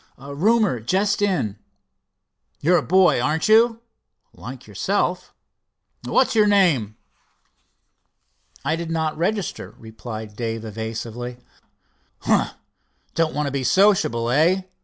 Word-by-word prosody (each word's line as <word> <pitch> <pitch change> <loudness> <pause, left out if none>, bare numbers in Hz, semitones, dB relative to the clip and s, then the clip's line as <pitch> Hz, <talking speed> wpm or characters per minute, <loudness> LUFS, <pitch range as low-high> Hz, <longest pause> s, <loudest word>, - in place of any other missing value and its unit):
"Roomer—just 185 - +1
come 205 - +2
in." 110 - -2 1.0
"You're 175 +4 +3
a - - -3
boy, 180 -9 +3
aren't 155 +5 0
you?" 230 +1 +4 0.5
"Like - - -10
yourself." - - -2 0.7
"What's 260 - +2
your 215 -2 +4
name?" 165 - +2 1.7
"I 155 +3 +1
did 165 0 -5
not 160 -1 -1
register," 190 +3 -3
replied 110 -1 -9
Dave 115 -1 -4
evasively. 115 +3 -6 0.8
"Humph! - - +1 0.6
don't 165 -1 0
want 150 0 -1
to 140 - -2
be 135 -1 -2
sociable, 130 - +2
eh? 170 +8 +3
155 Hz, 110 wpm, -22 LUFS, 115-190 Hz, 1.7 s, you